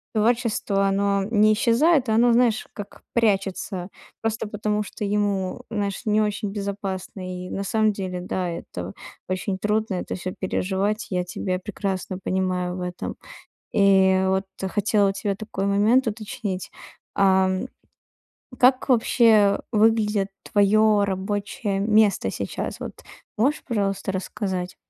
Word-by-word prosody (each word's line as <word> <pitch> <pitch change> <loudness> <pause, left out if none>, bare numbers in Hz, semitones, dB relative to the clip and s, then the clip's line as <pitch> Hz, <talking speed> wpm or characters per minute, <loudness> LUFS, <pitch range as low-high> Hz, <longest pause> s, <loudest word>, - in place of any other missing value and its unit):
творчество, 215 -3 +1
оно 200 0 +1
не 215 0 +4
исчезает, 250 +4 +3
оно, 235 +2 +4
знаешь 235 -2 +3
как, 205 -1 -9
прячется 195 -4 0 0.3
просто 225 0 -2
потому 210 0 -1
что 210 - -6
ему, 200 -2 -1
знаешь, 200 -3 -2
не 215 0 +3
очень 210 -1 -1
безопасно. 190 -2 -5
И - - -8
на 195 - -3
самом 215 +1 +2
деле, 185 -2 -4
да, 180 0 -2
это 95 - -6 0.4
очень 190 +1 -2
трудно, 210 -1 0
это - - -4
всё 185 0 -5
переживать. 200 +3 -1
Я 180 -1 0
тебя 185 +1 -3
прекрасно 190 -1 -4
понимаю 185 -1 -1
в 180 - -5
этом. 180 0 -5 0.6
И 190 -1 +4
вот 190 +1 +1 0.3
хотела 205 -1 +2
у - - +1
тебя 200 0 -2
такой 195 -1 -4
момент 215 +6 +3
уточнить. 205 -3 -4 0.4
Ам, 190 -1 +3 0.9
как 255 +2 +4
вообще 225 -4 +4
выглядит 210 -2 +2
твое 210 +1 +4
рабочее 200 +1 -2
место 205 - +3
сейчас? 100 - -4
Вот - - -7 0.4
можешь, 275 +7 +1
пожалуйста, 200 -5 -1
рассказать? 185 -1 -3
200 Hz, 130 wpm, -24 LUFS, 190-215 Hz, 0.9 s, не